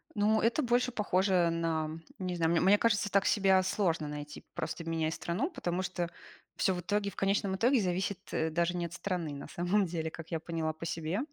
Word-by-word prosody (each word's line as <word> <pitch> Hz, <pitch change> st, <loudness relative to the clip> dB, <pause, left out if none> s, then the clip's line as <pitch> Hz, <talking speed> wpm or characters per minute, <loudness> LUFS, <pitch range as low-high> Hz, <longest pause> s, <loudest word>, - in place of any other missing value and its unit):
Ну, 215 Hz, +1 st, +3 dB
это 230 Hz, +7 st, +2 dB
больше 245 Hz, +1 st, +2 dB
похоже 190 Hz, -5 st, +2 dB
на, 160 Hz, -1 st, -1 dB, 0.2 s
не 185 Hz, -1 st, -3 dB
знаю, 165 Hz, -1 st, +2 dB
мне 170 Hz, -, +3 dB
мне 195 Hz, +3 st, +6 dB
кажется, 210 Hz, -1 st, +2 dB
так 200 Hz, -1 st, +3 dB
себя 190 Hz, -2 st, +4 dB
сложно 175 Hz, -5 st, 0 dB
найти, 150 Hz, 0 st, -7 dB
просто 170 Hz, -, -3 dB
меняя 160 Hz, -1 st, -1 dB
страну, 185 Hz, -, -2 dB
потому 180 Hz, -, -2 dB
что 175 Hz, -2 st, -2 dB, 0.5 s
всё 190 Hz, -, +2 dB
в 180 Hz, -, -3 dB
итоге, 200 Hz, +3 st, 0 dB
в -, -, -17 dB
конечном 195 Hz, 0 st, +1 dB
итоге 245 Hz, +6 st, +3 dB
зависит, 185 Hz, +1 st, -1 dB
э, 160 Hz, 0 st, +1 dB
даже 170 Hz, +2 st, 0 dB
не 175 Hz, -, -1 dB
от 170 Hz, -, -7 dB
страны, 170 Hz, -3 st, -3 dB
на 140 Hz, -, -7 dB
самом 185 Hz, +3 st, +1 dB
деле, 160 Hz, -2 st, -3 dB
как 165 Hz, +1 st, -10 dB
я 165 Hz, -, 0 dB
поняла 160 Hz, -1 st, -2 dB
по 165 Hz, +1 st, -8 dB
себе. 165 Hz, +3 st, -2 dB
180 Hz, 205 wpm, -31 LUFS, 165-200 Hz, 0.5 s, мне